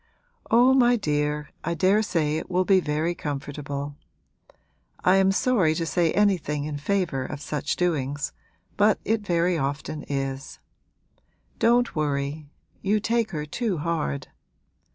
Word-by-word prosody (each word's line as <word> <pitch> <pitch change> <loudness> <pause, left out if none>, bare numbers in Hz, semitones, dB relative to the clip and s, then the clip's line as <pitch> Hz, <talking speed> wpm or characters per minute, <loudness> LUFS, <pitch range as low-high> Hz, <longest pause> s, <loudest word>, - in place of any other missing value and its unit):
'Oh, 245 +3 +6
my 245 -2 +5
dear, 150 -6 -1
I 170 +1 -1
daresay 180 -4 +2
it - - -6
will 185 0 +1
be 190 -1 +5
very 155 +1 -1
comfortable; 145 -1 -5 1.1
I 185 +1 +5
am 195 0 +4
sorry 195 -7 +2
to 165 - -1
say 170 -1 +1
anything 180 -8 +1
in 145 -1 -4
favour 170 -4 0
of 145 +2 -6
such 150 0 -2
doings, 145 -5 -1 0.4
but 210 0 +4
it 225 0 +1
very 175 -3 +1
often 140 +2 -3
is. 135 0 -3 1.0
Don't 240 +1 +3
worry; 145 0 -2 0.3
you 210 +2 +2
take 230 +1 0
her 150 -4 -4
too 205 +4 -2
hard. 150 -3 -2
160 Hz, 130 wpm, -25 LUFS, 145-195 Hz, 1.1 s, Oh